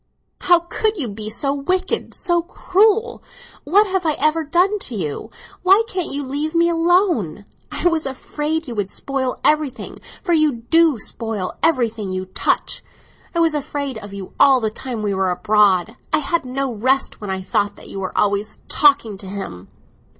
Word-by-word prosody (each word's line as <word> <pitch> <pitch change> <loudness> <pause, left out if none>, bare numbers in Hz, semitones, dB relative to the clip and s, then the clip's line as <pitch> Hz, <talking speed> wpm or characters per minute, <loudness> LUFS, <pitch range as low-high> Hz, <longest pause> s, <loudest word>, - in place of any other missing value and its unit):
How 350 -1 +5
could 425 +5 -1
you 280 -8 0
be 210 +1 -5
so 275 +5 -1
wicked, 365 +7 -1
so 345 -2 +1
cruel? 420 +6 +1 0.4
What 400 +8 +5
have 380 -2 -1
I 315 -2 +2
ever 310 +3 +1
done 360 +7 +2
to 255 - -5
you; 155 -8 -4 0.3
why 385 +4 +5
can't 370 -6 -3
you 285 +1 -2
leave 290 +4 -3
me 340 0 +4
alone? 335 - +1 0.3
I - - 0
was 325 -4 +1
afraid 300 +4 -3
you 240 - -5
would 205 -3 -2
spoil 265 +1 -3
everything; 300 -3 0 0.3
for 345 - +1
you 310 -3 +3 0.2
do 330 -4 +5
spoil 215 -2 -3
everything 230 -10 +1
you 185 0 -3
touch; 185 - -1 0.5
I - - +2
was 325 -2 +3
afraid 285 -4 -3
of 205 -1 -10
you 200 -2 -8
all 275 -2 +6
the 220 -2 -1
time 235 -1 -5
we 205 -1 0
were 190 -1 +1
abroad; 205 +2 +2 0.2
I - - +4
had 305 0 -1
no 260 0 -2
rest 260 +5 0
when 205 - -5
I 190 0 -3
thought 205 +2 0
that - - -13
you 195 - -6
were 190 -1 -5
always 205 +1 0
talking 275 -9 +3
to 195 - -9
him." 140 - -7
275 Hz, 180 wpm, -20 LUFS, 210-335 Hz, 0.5 s, all